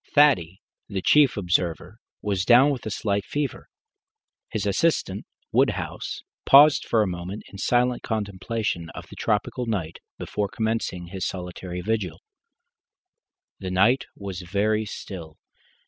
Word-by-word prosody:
Thaddy, 100 - +4 0.3
the 95 -3 -3
chief 145 -6 +5
observer, 90 +1 -1 0.2
was 100 -3 0
down 125 +8 +6
with 130 -5 -4
a - - -1
slight 100 0 -1
fever. 145 +4 -4 0.8
His - - -2
assistant, - - 0 0.2
Woodhouse, - - 0 0.2
paused 145 +1 +7
for 110 -2 +3
a - - -1
moment 90 +3 -5
in 100 - -10
silent 125 +3 +2
contemplation 105 -4 -3
of - - -7
the - - -11
tropical 115 +3 -1
night 90 -8 -3 0.2
before 105 -1 -2
commencing 110 -6 -2
his 95 0 -5
solitary 90 0 -5
vigil. 105 0 -2 1.4
The 95 - -4
night 100 +8 +3
was 95 -3 -6
very 105 +4 0
still. 85 -6 -8
100 Hz, 130 wpm, -25 LUFS, 90-115 Hz, 1.4 s, paused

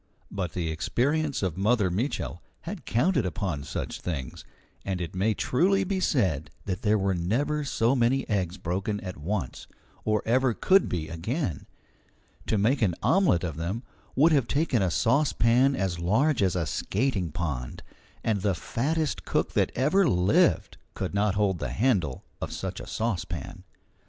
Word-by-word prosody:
But 90 -5 -3
the 85 -3 -2
experience 140 - 0
of 90 -1 -2
Mother 105 -2 +2
Mitchel 100 - -2 0.2
had 180 +1 -7
counted 135 +3 +2
upon 90 -4 -2
such - - -5
things, 70 -8 -5 0.4
and 95 -2 -2
it 85 -2 -4
may 100 +4 +1
truly 195 +8 +2
be 190 0 -1
said 90 - +1 0.2
that 95 +1 -3
there 110 -3 +3
were 95 -1 +1
never 125 - 0
so 125 -2 +1
many 125 +2 +2
eggs 95 -3 -1
broken 95 +4 -2
at 90 -1 -6
once, 85 0 -4 0.4
or 110 -1 +1
ever 125 0 +2
could 195 0 +4
be 80 -3 -2
again. 85 - -3 0.8
To 110 - +1
make 120 +8 +2
an 95 -6 +2
omelette 135 - +3
of 80 -4 -3
them 95 +9 -3 0.3
would 155 +6 +5
have 135 -6 +3
taken 140 -6 +1
a 95 - +2
saucepan 125 - +3
as 95 -6 -1
large 115 - +2
as 95 -2 +2
a 85 -3 0
skating 100 - -1
pond, 70 -7 -4 0.4
and 105 -4 0
the 100 -2 +1
fattest 150 - -1
cook - - -1
that - - +2
ever 160 +8 +3
lived 90 +3 +2 0.2
could - - -3
not 100 0 +1
hold 100 -4 +1
the 70 - -3
handle 95 - +1 0.2
of - - -3
such - - -4
a - - -8
saucepan. 90 - -3
105 Hz, 160 wpm, -27 LUFS, 90-130 Hz, 0.8 s, would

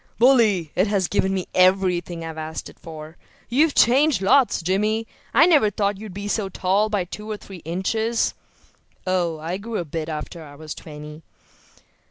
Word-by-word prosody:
"Bully; 220 - +4
it 185 +4 +2
has 200 -3 +1
given 190 -1 +1
me 190 -2 -1
everything 185 -2 +2
I - - -5
asked 160 0 -6
it - - -18
for. 155 0 -10 0.3
You've 290 +5 +3
changed 270 0 +4
lots, 245 -2 +3
Jimmy. 210 +5 0 0.3
I 280 +7 +6
never 295 -11 +5
thought 200 -1 -1
you 215 0 -8
were 200 +2 -6
so 205 -1 -1
tall 195 +3 +1
by 205 -3 0
two 210 +4 -8
or 215 - -3
three 190 -4 -11
inches." 220 +7 0 0.7
"Oh, 175 -3 0
I 165 +4 -4
grew 220 +2 -5
a 175 - -3
bit 160 +1 -4
after 155 +2 -6
I 145 -2 -12
was 155 0 -7
twenty." 150 0 -10
190 Hz, 175 wpm, -23 LUFS, 165-215 Hz, 0.7 s, I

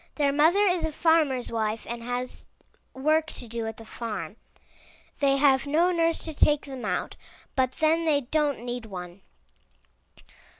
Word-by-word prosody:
Their 285 -2 +2
mother 320 +7 +4
is 360 -3 +2
a 320 - -1
farmer's 305 -6 +2
wife 220 -1 -2
and 235 0 -5
has 245 +1 -4 0.4
work 310 +4 +1
to 240 - -9
do 230 0 -4
at 225 - -6
the 225 - -11
farm. 210 -6 -5 0.8
They 275 -1 +3
have 275 -1 +3
no 335 +5 +3
nurse 330 -1 +1
to 320 - -4
take 295 0 +3
them 265 -3 -7
out, - - -2 0.4
but 260 -1 +1
then 320 +3 +2
they 295 -3 +3
don't 285 -2 -1
need 245 -2 -4
one. 180 -1 -8
275 Hz, 160 wpm, -26 LUFS, 235-315 Hz, 0.8 s, mother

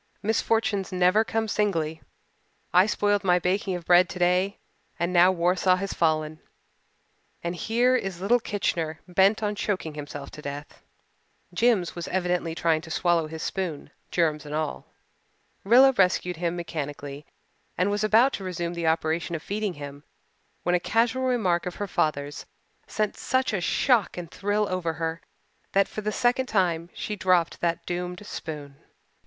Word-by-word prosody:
Misfortunes 220 -2 0
never 185 +4 +4
come 225 0 -1
singly. 165 -8 -1 0.7
I 185 +3 +6
spoiled 205 -1 +1
my 180 -2 +4
baking 185 +1 0
of 175 -2 -7
bread 180 +1 +5
today 180 +2 +1 0.4
and 170 +2 -1
now 180 +1 +6
Warsaw 180 +1 +2
has 195 +1 -3
fallen 155 -1 0 1.0
and 170 +1 -2
here 240 +7 +2
is 195 -7 -2
little 220 +6 +3
Kitchener 165 -7 -2
bent 195 +4 +3
on 210 0 0
choking 190 -6 -2
himself 145 -1 -7
to 150 - -10
death." 145 0 -7 0.7
Jims 210 -3 +2
was 170 -1 -5
evidently 180 -3 -1
trying 160 -2 +1
to 160 - -11
swallow 170 -1 +1
his 160 0 -7
spoon, 180 -6 -4 0.2
germs 155 -3 +1
and 150 0 -6
all. 155 -1 -3 0.8
Rilla 255 +6 +7
rescued 180 -5 +1
him 170 0 -1
mechanically 145 -4 -5 0.5
and 185 +3 +2
was 205 +1 -1
about 225 +5 +4
to 195 - -4
resume 175 -2 -3
the 170 -1 -2
operation 160 +1 0
of 160 - -6
feeding 205 -2 -2
him 145 0 -9 0.6
when 180 - +1
a 180 - +4
casual 235 +6 +1
remark 190 -9 +1
of 180 - -5
her 205 - -3
father's 145 -4 -2 0.4
sent 215 -2 -1
such 260 -2 0
a 195 - 0
shock 240 +3 +2
and 170 -2 -6
thrill 205 +2 0
over 180 -3 -2
her 160 +1 -3 0.5
that 195 0 +4
for 215 - -6
the 215 0 -2
second 245 +3 +1
time 175 -6 0
she 210 - -4
dropped 180 -4 +1
that 170 -1 -1
doomed 180 +2 -4
spoon. 145 -7 -7
180 Hz, 160 wpm, -26 LUFS, 165-205 Hz, 1.0 s, Rilla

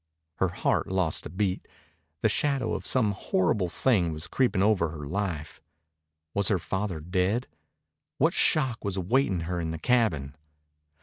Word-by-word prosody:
Her 95 - +2
heart 90 - 0
lost 95 -4 0
a - - -12
beat. 95 +2 -2 0.6
The - - +6
shadow 135 0 0
of - - -4
some 115 -5 +2
horrible 95 -1 0
thing 90 -2 +2
was 75 0 -6
creeping 115 -7 +1
over 100 -6 +3
her 75 -2 -7
life. 85 -3 -3 0.7
Was 100 -1 0
her 100 - +3
father 95 0 -3
dead? 90 +8 0 0.7
What - - +3
shock 130 -7 +2
was 100 -2 -2
awaiting 95 0 +1
her 90 +2 -3
in 80 - -2
the 80 - -3
cabin? 80 - +1
95 Hz, 150 wpm, -27 LUFS, 85-110 Hz, 0.7 s, The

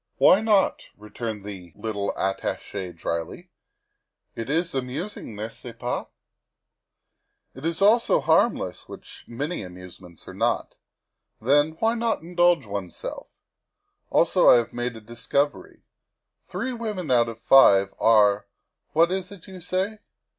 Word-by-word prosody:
" - - -49
Why 195 - +7
not?" 210 -3 +1
returned 105 0 -6
the 90 -5 -9
little 105 -3 -3
Attache 95 -1 -3
dryly, 85 0 -5 0.4
" - - -54
it 115 +2 -5
is 165 +4 0
amusing, 135 - -5
n'est 110 +2 -6
ce - - -9
pas? - - -3 1.5
It 135 +5 -5
is 165 +3 -1
also 225 +3 +4
harmless, - - +1
which - - -12
many 145 +9 -4
amusements 90 -1 -12
are - - -8
not. - - -1 0.6
Then, 145 +6 +3
why 225 +4 +2
not 230 -6 -1
indulge 175 -4 +2
oneself? 100 -3 -6 0.8
Also, - - +4
I - - +9
have 120 -1 0
made 120 0 -3
a 110 - -10
discovery; 120 +6 -3 0.6
three 260 -1 -4
women 210 - -4
out 120 -2 +3
of 115 - -8
five 100 -8 +6
are 105 -2 +4 0.5
what 165 +3 +4
is 190 0 -3
it 200 -4 -12
you 190 -2 -10
say? 190 +5 -2
130 Hz, 135 wpm, -24 LUFS, -, 1.5 s, I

